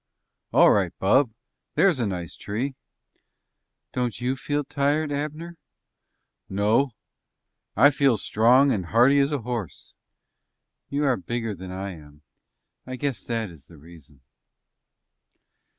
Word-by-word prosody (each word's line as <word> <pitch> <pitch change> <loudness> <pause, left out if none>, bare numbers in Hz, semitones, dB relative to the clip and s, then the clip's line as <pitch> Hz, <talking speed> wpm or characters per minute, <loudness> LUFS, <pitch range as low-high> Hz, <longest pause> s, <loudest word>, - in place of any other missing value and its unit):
"All - - +6
right, 95 -4 +2
bub. 120 +7 +3 0.5
There's 185 -8 +3
a 115 - 0
nice 90 -4 -5
tree." 120 +7 -4 1.2
"Don't 120 -6 -2
you 125 +2 -1
feel 145 +1 -2
tired, 145 +2 0
Abner?" 155 +4 -4 0.9
"No; 110 +6 +1 0.8
I 145 - +6
feel 140 -3 +3
as 105 - -7
strong 125 +6 +4
as 95 -7 -1
hearty 125 +9 +4
as 140 +1 +2
a 140 -6 -2
horse." 115 - -6 1.0
"You 145 +1 -1
are 135 -4 +2
bigger 115 +3 -3
than 95 0 -9
I 95 +1 -5
am. 75 -3 -14 0.6
I 130 - -5
guess 135 -1 -3
that 115 -5 -2
is 75 -4 -16
the 85 - -16
reason." 75 -3 -16
120 Hz, 130 wpm, -25 LUFS, 95-140 Hz, 1.2 s, All